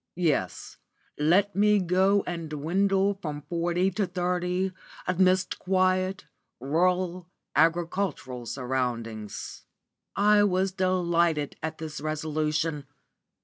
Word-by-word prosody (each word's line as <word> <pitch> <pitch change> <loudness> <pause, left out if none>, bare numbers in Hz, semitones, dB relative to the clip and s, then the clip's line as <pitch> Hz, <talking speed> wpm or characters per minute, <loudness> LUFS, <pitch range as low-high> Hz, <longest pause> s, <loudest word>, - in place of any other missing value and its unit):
Yes, 170 -3 -1 0.4
let 190 +7 +3
me 210 +1 +4
go 190 +2 +3
and 170 -3 -4
dwindle 195 +6 +1
from 150 -4 -5
forty 175 +3 0
to 195 +1 -1
thirty 180 +1 -1 0.3
amidst 185 +1 +2
quiet, 185 -1 +1 0.3
rural, 180 +5 0 0.3
agricultural 165 -6 0
surroundings." 120 -5 -4 0.5
I 205 0 +5
was 190 -1 +1
delighted 170 -5 +1
at 160 0 -4
this 155 -2 -6
resolution. 155 -1 -1
175 Hz, 95 wpm, -27 LUFS, 155-185 Hz, 0.5 s, I